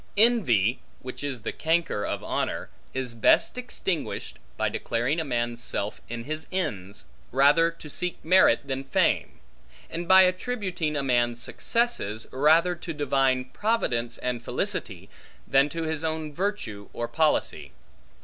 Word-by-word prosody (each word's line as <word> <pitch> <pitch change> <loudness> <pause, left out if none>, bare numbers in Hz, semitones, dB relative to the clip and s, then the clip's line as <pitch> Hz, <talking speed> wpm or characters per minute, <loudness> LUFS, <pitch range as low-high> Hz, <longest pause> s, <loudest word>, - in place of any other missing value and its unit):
Envy, 145 - +4 0.2
which 130 +2 -8
is 135 -6 -4
the - - -2
canker 165 -9 0
of - - -3
honor, - - -2 0.2
is 130 -2 -4
best 115 - +3
extinguished 220 -9 -4 0.2
by - - +1
declaring 120 +8 -1
a - - 0
man's 120 -3 -2
self 105 -2 -3
in 120 0 -5
his 155 +4 -5
ends, 105 - -3 0.3
rather 145 +6 +5
to 165 -2 -11
seek 180 +4 -3
merit 180 -9 +5
than 135 0 -3
fame; 135 - 0 0.5
and 170 +1 -4
by 190 0 +8
attributing 185 -5 -1
a 140 - 0
man's 120 -2 +1
successes, 120 - 0
rather 160 +6 +4
to 170 -1 -6
divine 135 -3 +1
Providence 130 - -1
and 125 -2 -3
felicity, - - -3 0.4
than 135 +2 +4
to 165 +2 -4
his 160 0 -1
own 160 -1 -2
virtue 140 - -3
or 120 - -3
policy. 155 +2 0
145 Hz, 140 wpm, -26 LUFS, 120-170 Hz, 0.5 s, by